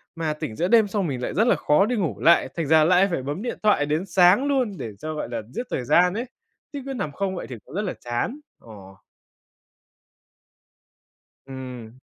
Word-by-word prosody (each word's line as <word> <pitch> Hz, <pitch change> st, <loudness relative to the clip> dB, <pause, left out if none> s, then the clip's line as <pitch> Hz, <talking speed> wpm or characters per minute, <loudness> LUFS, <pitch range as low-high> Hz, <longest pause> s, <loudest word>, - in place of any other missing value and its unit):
mà 160 Hz, -2 st, -2 dB
tỉnh 135 Hz, -7 st, -6 dB
giữa 175 Hz, +7 st, 0 dB
đêm 220 Hz, -1 st, +5 dB
xong 195 Hz, -3 st, -1 dB
mình 130 Hz, -3 st, -4 dB
lại -, -, -3 dB
rất 220 Hz, +6 st, +2 dB
là -, -, +4 dB
khó 150 Hz, +7 st, +3 dB
đi 245 Hz, +2 st, -1 dB
ngủ 160 Hz, -, -2 dB
lại, 165 Hz, +8 st, +4 dB
thành 165 Hz, -4 st, -2 dB
ra 160 Hz, 0 st, +5 dB
lại 185 Hz, +4 st, +4 dB
phải 135 Hz, -6 st, -2 dB
bấm 145 Hz, +7 st, -4 dB
điện 245 Hz, -, -4 dB
thoại 205 Hz, -9 st, +3 dB
đến 155 Hz, +5 st, -1 dB
sáng 190 Hz, +7 st, +4 dB
luôn 255 Hz, -9 st, 0 dB
để 110 Hz, -, -6 dB
cho, 155 Hz, 0 st, -5 dB
gọi 150 Hz, -, -5 dB
là, 115 Hz, -2 st, -3 dB
giết 245 Hz, -, -3 dB
thời 125 Hz, -, -2 dB
gian 180 Hz, +7 st, +4 dB
ấy, 230 Hz, +4 st, -3 dB, 0.5 s
chứ 280 Hz, -, -5 dB
cứ 270 Hz, -, -4 dB
nằm 155 Hz, -, -3 dB
không 190 Hz, +5 st, -3 dB
vậy -, -, -6 dB
thì 125 Hz, -, -6 dB
cũng -, -, -12 dB
rất 205 Hz, -, 0 dB
là 195 Hz, -, -3 dB
chán, 120 Hz, -, -3 dB, 0.2 s
ờ. 95 Hz, -4 st, -13 dB, 2.5 s
Ừm. 125 Hz, -3 st, -9 dB
170 Hz, 215 wpm, -24 LUFS, 130-205 Hz, 2.5 s, đêm